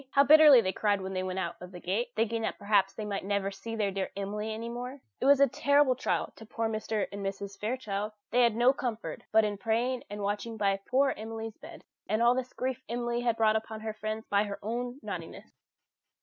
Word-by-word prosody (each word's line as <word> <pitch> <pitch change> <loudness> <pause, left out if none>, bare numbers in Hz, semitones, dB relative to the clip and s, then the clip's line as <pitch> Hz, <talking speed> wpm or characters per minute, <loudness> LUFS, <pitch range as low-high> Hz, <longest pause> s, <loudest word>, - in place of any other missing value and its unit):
How 280 +1 +5
bitterly 300 -3 +8
they 185 - -1
cried 205 -2 +1
when 190 0 -5
they 185 - -1
went 185 0 -3
out 190 - -3
of 180 0 -9
the 180 - -9
gate, 200 +8 -1
thinking 225 +1 0
that - - -2
perhaps 200 -1 +2
they 215 +2 -6
might 200 -1 -3
never 200 0 -1
see 225 +4 -6
their 210 -3 0
dear 190 0 -2
Emily 210 +2 -3
any 225 +2 -5
more! 250 +3 -6 0.2
It - - -1
was 280 -1 +7
a 280 - +6
terrible 285 +1 +3
trial 255 - -1
to 220 - -11
poor 225 +1 -2
Mr. 215 -1 -1
and 200 0 -6
Mrs. 195 0 -5
Fairchild. 215 -2 -3 0.2
They 245 +2 +4
had 235 -3 +4
no 245 +3 +5
comfort 240 -5 -4
but 220 0 +5
in 205 -1 -3
praying 240 +4 0
and 205 0 -5
watching 210 +3 -2
by 200 -2 +2
poor 270 +1 +3
Emily's 225 0 -6
bed. 320 +2 -11 0.3
And 215 +3 +2
all 240 +1 +6
this 255 0 -3
grief 260 0 -3
Emily 240 0 0
brought 220 -1 +4
upon 220 0 -3
her 220 0 -4
friends 215 +1 -4
by 205 +1 +2
her 200 -1 -5
own 245 +4 -3
naughtiness. - - -7
220 Hz, 220 wpm, -30 LUFS, 205-245 Hz, 0.3 s, bitterly